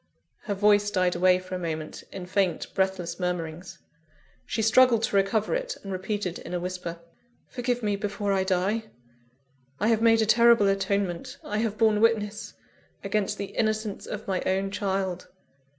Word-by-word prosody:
Her 205 - -2
voice 205 +1 +4
died 185 -3 +1
away 180 +1 +4
for 185 0 -9
a 185 - -2
moment, 160 -3 -5
in 185 - -7
faint, 185 0 -1
breathless 190 -3 -1
murmurings. 175 -1 -4 0.7
She 220 - -1
struggled 230 0 +5
to 205 - 0
recover 200 +2 +2
it, - - -2
and 195 - -6
repeated 190 -1 -3
in 180 - -6
a - - -1
whisper: 180 -1 -5 0.5
"Forgive 245 -1 -2
me 205 -1 +1
before 205 0 -2
I 190 -1 +2
die! 190 +4 0 0.9
I 215 - +2
have 225 -1 +2
made 225 -1 +5
a - - +1
terrible 235 -1 +5
atonement; 195 -2 -1
I 210 +1 -2
have 215 -2 -1
borne 215 -1 +3
witness 215 -2 0 0.5
against 210 0 -1
the 200 - -6
innocence 215 -2 -1
of 210 0 -6
my 190 -2 0
own 195 +1 0
child. 190 -3 -2
200 Hz, 165 wpm, -26 LUFS, 185-215 Hz, 0.9 s, struggled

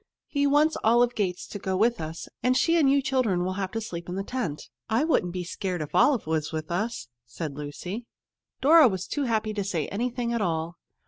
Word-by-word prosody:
He 285 -1 +1
wants 295 +3 +3
Olive 240 +2 +4
Gates 185 -5 -2
to 205 - -7
go 190 -1 -1
with 230 0 +2
us, 160 +1 -6
and 255 +1 +3
she 335 - +3
and 305 -5 +4
you 280 0 +3
children 240 -10 +1
would 185 - -1
have 190 -2 -2
to 225 - -1
sleep 170 -6 -6
in 180 - -3
the 195 - -2
tent." 205 - -4 0.2
"I 225 +5 +2
wouldn't 250 - +1
be 180 0 -4
scared 180 +1 -3
if 150 -1 -5
Olive 230 +7 +4
was 155 -1 -1
with 155 0 -4
us," 195 - -2 0.2
said 140 +5 -5
Lucy. 175 - -6 0.5
Dora 310 +1 +8
was 190 -5 -2
too 290 -2 -2
happy 220 -2 0
to 205 -1 -2
say 175 -6 -1
anything 240 +2 -2
at 235 - 0
all. 165 -2 -2
205 Hz, 215 wpm, -26 LUFS, 175-245 Hz, 0.5 s, Dora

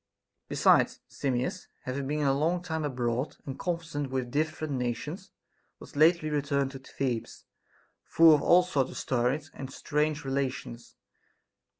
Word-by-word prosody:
Besides, - - +4
Simmias, 130 -2 -2 0.2
having 135 +1 -3
been 150 +1 -1
a 135 - +4
long 165 +5 0
time 160 -3 -3
abroad 125 -1 -2
and 135 -1 -6
conversant 165 -5 -3
with 130 -2 -2
different 155 +1 -1
nations, 125 -3 -3 0.5
was - - -13
lately 155 +1 +4
returned 140 -2 0
to 135 - -8
Thebes, 130 -3 -4 0.6
full 165 -1 +6
of 150 - +3
all 180 +1 +6
sorts 140 -8 0
of - - -8
stories 135 +4 -1
and 135 -1 -7
strange 150 +1 -1
relations. 135 -3 -3
140 Hz, 135 wpm, -29 LUFS, 130-155 Hz, 0.6 s, full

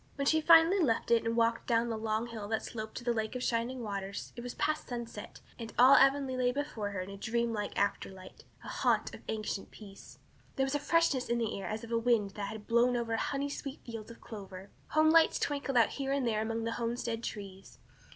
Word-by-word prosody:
When 280 - -2
she 315 +2 +3
finally 330 +4 +6
left 235 -8 +1
it 230 -1 +4
and 230 +1 0
walked 230 0 +1
down 235 0 +2
the 225 - -1
long 220 +1 -1
hill 225 -3 -7
that 220 +1 -1
sloped 220 -1 -6
to - - -6
the 240 0 +1
Lake 220 +1 -2
of 250 - -3
Shining 240 +2 -1
Waters 200 -2 -5
it 240 - -7
was 245 0 -6
past 310 0 -1
sunset 235 -4 -7 0.2
and 230 -1 -6
all 255 +3 +8
Avonlea 270 -1 +4
lay 250 -1 +2
before 250 -7 -3
her 200 -2 -4
in 185 +2 -7
a 200 - -8
dreamlike 225 -1 -2
afterlight 190 -2 -3 0.2
"a - - -10
haunt - - 0
of - - -10
ancient 215 -2 -3
peace." 200 -2 -13 0.4
There 270 - +1
was 270 - -3
a 290 - +1
freshness 295 -4 +2
in 235 - +1
the 230 -2 -1
air - - -5
as 215 +1 -4
of 230 - -9
a 230 - +2
wind 230 -4 +2
that 200 0 -5
had 210 0 -8
blown 240 +1 +3
over 230 -1 -1
honey 280 +4 -1
sweet 280 0 -6
fields 225 -2 -7
of 235 - -12
clover. 195 -3 -9 0.2
Home 310 +1 +4
lights 325 0 +5
twinkled 280 -2 -1
out 230 -3 +5
here 270 -1 -3
and 275 -2 0
there 215 -2 +1
among 225 +1 -2
the 230 - -2
homestead 230 -1 -2
trees. 195 -4 -8
230 Hz, 230 wpm, -31 LUFS, 215-260 Hz, 0.4 s, all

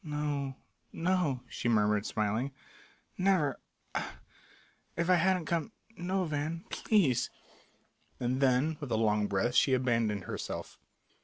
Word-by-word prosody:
"No 145 -3 -2 0.4
no," 165 -7 0
she 120 - -2
murmured, 105 -2 +3
smiling; 110 +5 0 0.7
"never 185 -8 +2 0.3
ah, - - -3 0.8
if 170 +2 +2
I - - +8
hadn't 180 0 +3
come 170 +6 -1 0.2
no, 185 0 -1
Van 155 +2 -3
please 175 - +2 0.4
" - - -39
And 125 +2 0
then 135 +4 +3
with 145 - -5
a 110 - +2
long 105 -2 +2
breath 105 +5 0
she 130 +1 +5
abandoned 115 -5 +1
herself. - - -5
140 Hz, 130 wpm, -31 LUFS, 115-170 Hz, 0.8 s, I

